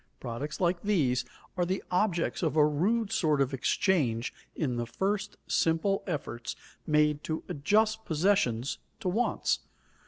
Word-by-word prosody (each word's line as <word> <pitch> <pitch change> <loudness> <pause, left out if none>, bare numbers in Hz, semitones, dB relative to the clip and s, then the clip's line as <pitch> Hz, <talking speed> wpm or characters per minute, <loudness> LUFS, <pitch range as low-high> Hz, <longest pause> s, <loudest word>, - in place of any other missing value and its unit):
Products 130 +5 -5
like 175 -1 +1
these 150 -12 +1 0.3
are 180 - +1
the 185 +2 -1
objects 180 -2 +1
of 160 -3 0
a 150 -1 +6
rude 200 +9 +1
sort 155 -10 +2
of 135 -1 +1
exchange 135 - +1 0.2
in 130 -6 -1
the 120 0 -2
first 200 - -2
simple 165 +5 +1
efforts 140 -8 -4 0.3
made 150 -1 +3
to 155 0 -3
adjust 215 +9 +2
possessions 150 - +1 0.2
to - - -4
wants. 225 +7 +1
165 Hz, 135 wpm, -29 LUFS, 140-195 Hz, 0.3 s, a